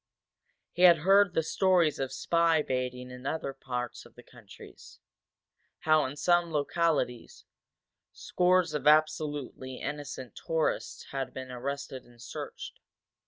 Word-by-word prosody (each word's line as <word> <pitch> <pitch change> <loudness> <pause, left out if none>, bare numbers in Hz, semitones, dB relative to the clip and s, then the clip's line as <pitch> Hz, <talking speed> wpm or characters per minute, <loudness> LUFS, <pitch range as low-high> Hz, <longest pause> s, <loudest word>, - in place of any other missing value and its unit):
He 175 - -5
had 170 -3 +7
heard 195 -1 +5
the 160 - +2
stories 175 -2 +2
of 135 -1 -2
spy 165 +3 +2
baiting 125 -1 -3
in 125 +1 -8
other 140 -2 -3
parts 125 -3 -5
of - - -18
the - - -14
country; - - -14 1.1
how, 155 -1 +3
in 130 +2 -5
some 175 +2 +2
localities, 150 -4 -1 0.7
scores 180 -2 +1
of 150 -1 -2
absolutely 150 -4 +1
innocent 145 -4 -6
tourists 160 -1 -2
had 135 -2 -4
been 130 -1 -7
arrested 135 +1 -5
and 120 -1 -20
searched. 120 - -8
145 Hz, 125 wpm, -29 LUFS, 130-165 Hz, 1.1 s, had